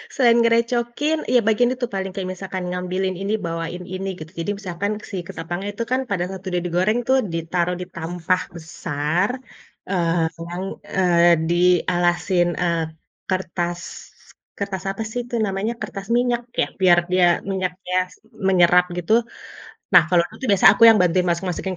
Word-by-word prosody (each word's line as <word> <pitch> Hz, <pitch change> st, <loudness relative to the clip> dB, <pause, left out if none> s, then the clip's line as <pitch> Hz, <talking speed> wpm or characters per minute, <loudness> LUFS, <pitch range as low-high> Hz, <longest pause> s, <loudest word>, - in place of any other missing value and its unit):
Selain 240 Hz, -3 st, +5 dB
ngerecokin, 240 Hz, +6 st, +1 dB
iya 250 Hz, -, +6 dB
bagian 240 Hz, +3 st, +3 dB
itu 250 Hz, -1 st, -3 dB
paling, 190 Hz, -1 st, -3 dB
kayak 185 Hz, -1 st, -4 dB
misalkan 185 Hz, 0 st, -6 dB
ngambilin 180 Hz, +1 st, -2 dB
ini, 200 Hz, +2 st, -1 dB
bawain 165 Hz, +2 st, -4 dB
ini 195 Hz, +1 st, -4 dB
gitu, 155 Hz, +1 st, -9 dB
jadi 165 Hz, +5 st, -1 dB
misalkan 200 Hz, +1 st, -3 dB, 0.2 s
si -, -, -4 dB
ketapangnya 175 Hz, +5 st, -5 dB
itu 230 Hz, -, -3 dB
kan 260 Hz, -, +2 dB
pada 185 Hz, -3 st, 0 dB
saat 190 Hz, -1 st, -8 dB
udah 180 Hz, -1 st, -1 dB
digoreng 185 Hz, +7 st, +1 dB
tuh 265 Hz, 0 st, +4 dB, 0.2 s
ditaruh 170 Hz, +2 st, -1 dB
di -, -, -4 dB
tampah 175 Hz, +2 st, -1 dB
besar, 160 Hz, +2 st, -2 dB, 0.6 s
eee, 170 Hz, -3 st, +1 dB, 0.2 s
yang, 180 Hz, +2 st, -4 dB, 0.3 s
eee, 175 Hz, -2 st, +5 dB, 0.2 s
dialasin, 175 Hz, 0 st, +2 dB, 0.2 s
eee, 170 Hz, -2 st, +1 dB, 0.5 s
kertas, 175 Hz, -2 st, -2 dB, 0.8 s
kertas 195 Hz, -2 st, -3 dB
apa 210 Hz, +3 st, -5 dB
sih 245 Hz, -, -2 dB
itu 240 Hz, 0 st, -5 dB
namanya, 195 Hz, +4 st, -2 dB
kertas 195 Hz, 0 st, -6 dB
minyak 245 Hz, -1 st, +1 dB, 0.2 s
ya, -, -, +1 dB
biar 175 Hz, -2 st, +6 dB
dia 180 Hz, -1 st, +4 dB, 0.3 s
minyaknya 185 Hz, -1 st, -3 dB, 0.2 s
s -, -, -16 dB, 0.3 s
menyerap 180 Hz, -1 st, +5 dB
gitu. 180 Hz, +5 st, 0 dB, 0.8 s
Nah -, -, +10 dB
kalau 175 Hz, 0 st, +4 dB
itu -, -, -23 dB
aku 260 Hz, +4 st, -6 dB
biasanya 195 Hz, -1 st, +7 dB
aku -, -, -3 dB
yang 225 Hz, -2 st, +7 dB
bantu 180 Hz, 0 st, +1 dB
masuk-masukin 180 Hz, +2 st, -2 dB
185 Hz, 155 wpm, -22 LUFS, 175-200 Hz, 0.8 s, Nah